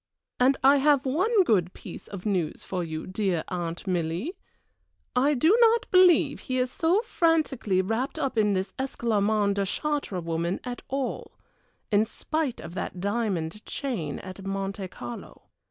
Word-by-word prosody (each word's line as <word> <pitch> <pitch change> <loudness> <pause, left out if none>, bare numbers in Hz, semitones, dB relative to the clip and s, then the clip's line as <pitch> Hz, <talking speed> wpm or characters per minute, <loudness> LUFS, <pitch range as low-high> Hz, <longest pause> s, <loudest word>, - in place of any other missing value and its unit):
And 260 +2 +4
I 275 +2 +7
have 280 -1 +3
one 380 - +3
good 185 - +2
piece - - -10
of 195 -1 -8
news 185 -7 -1
for 180 -2 -3
you, 160 -1 -5
dear 185 -3 -1
Aunt 175 -1 -4
Milly. 180 - -2 0.8
I 280 +4 +3
do 320 - +4
not 460 -1 +5
believe 355 -6 +5
he 255 - -3
is 250 0 0
so 350 - +2
frantically 300 - +1
wrapped 225 +7 -2
up 270 - -1
in 210 -2 +3
this 190 0 -2
Esclarmonde 215 -5 +1
de 200 - +1
Chartres 285 - -2
woman 170 +2 -1
after 245 -1 -6
all 270 -1 -3 0.6
in 210 +1 +4
spite 310 +2 -3
of 170 - -8
that 185 - -4
diamond 200 -3 -2
chain 190 - -3
at 185 +1 -9
Monte 195 0 -3
Carlo. 120 -8 -9
215 Hz, 155 wpm, -27 LUFS, 185-275 Hz, 0.8 s, I